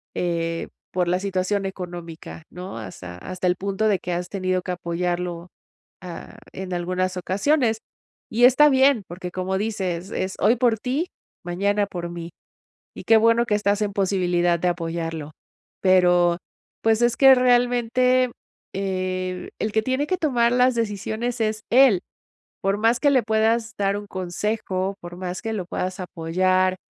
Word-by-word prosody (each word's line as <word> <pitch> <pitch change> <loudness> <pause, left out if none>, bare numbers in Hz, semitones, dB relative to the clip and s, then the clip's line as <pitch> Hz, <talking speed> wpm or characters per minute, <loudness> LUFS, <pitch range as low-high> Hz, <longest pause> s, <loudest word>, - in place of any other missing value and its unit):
eh, 165 -1 -2 0.3
por 180 -1 +1
la 180 +1 +1
situación 195 +1 -1
económica, 170 - -7
¿no? 180 -5 -7
Hasta 90 -4 -9
hasta 185 - -4
el 180 - +3
punto 200 +3 -1
de 205 - +3
que 180 - -4
has 175 +1 -3
tenido 185 -2 -1
que 185 - -4
apoyarlo, 175 0 -3 0.5
ah, 180 -2 -9 0.2
en 190 0 -6
algunas 185 +1 -1
ocasiones 225 - +1 0.5
y 235 +2 +5
está 280 +4 +7
bien, 265 -3 +4
porque 180 +1 -7
como 185 +1 -2
dices: 190 -4 -3
"Es 190 0 -2
hoy 220 +5 +4
por 230 -1 +2
ti, 275 +9 -1 0.4
mañana 200 +3 0
por 175 -3 -5
mí". 170 0 -6 0.7
Y - - -8
qué 225 - +6
bueno 230 +1 +4
que 225 - -1
estás 205 0 +1
en 205 -1 -2
posibilidad 180 -3 +1
de 180 - +1
apoyarlo. 165 -3 -4 0.5
Pero, 175 -2 +4 0.4
pues, 225 0 +2
es 240 -1 +3
que 270 -1 +8
realmente, 245 0 +3 0.4
eh, 185 -1 -3
el 215 - -1
que 220 - +3
tiene 260 +4 0
que 370 - 0
tomar 245 -8 +2
las 250 +1 +4
decisiones 230 +2 -2
es 215 0 0
él. 245 -7 +6 0.6
Por 195 +1 +1
más 230 +2 +2
que 290 - +3
le 260 -3 +4
puedas 225 +1 +1
dar 200 0 +1
un 205 - -8
consejo, 190 +1 -3
por 175 0 -9
más 180 0 -5
que 225 - -3
lo 190 - -3
puedas 185 +1 -3
apoyar. 185 +2 +1
190 Hz, 160 wpm, -23 LUFS, 180-225 Hz, 0.7 s, que